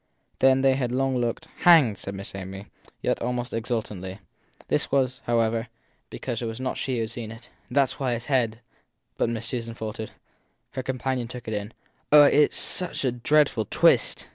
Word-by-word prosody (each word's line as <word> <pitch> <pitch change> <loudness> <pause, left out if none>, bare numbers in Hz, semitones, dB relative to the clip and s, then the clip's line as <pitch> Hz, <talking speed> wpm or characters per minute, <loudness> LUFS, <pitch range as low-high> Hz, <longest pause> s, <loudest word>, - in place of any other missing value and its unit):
Then 130 0 +5
they 135 0 +4
had 125 -3 -1
a - - -1
long 135 0 +1
look. 120 +6 -2
Hanged! 150 - +6
said 100 - -6
Miss 100 0 -7
Amy 95 +1 -7 0.4
yet - - 0
almost 125 0 -2
exultantly. 105 -5 -3 0.5
This - - 0
was, 130 -1 +1
however, 115 0 +1 0.4
because 120 -3 -4
it 115 - -2
was 115 +2 -5
not 130 0 -2
she 130 - -2
who 115 - -1
had 110 0 -3
seen. 115 -1 -7 0.3
That 140 +2 +4
s 135 - -6
why 130 -3 0
his 120 0 -4
head 120 -5 0 0.6
but - - +2
Miss 115 -1 -3
Susan 115 -1 -4
faltered. 110 -1 -5 0.6
Her 130 - -4
companion 130 -1 -2
took 125 -1 -9
it 110 - -3
in. 105 +1 -4 0.4
Oh, 150 0 +9
has 150 +1 +4
such 180 -6 0
a 130 - +2
dreadful 125 -1 +2
twist? - - +3
120 Hz, 185 wpm, -25 LUFS, 110-130 Hz, 0.6 s, Oh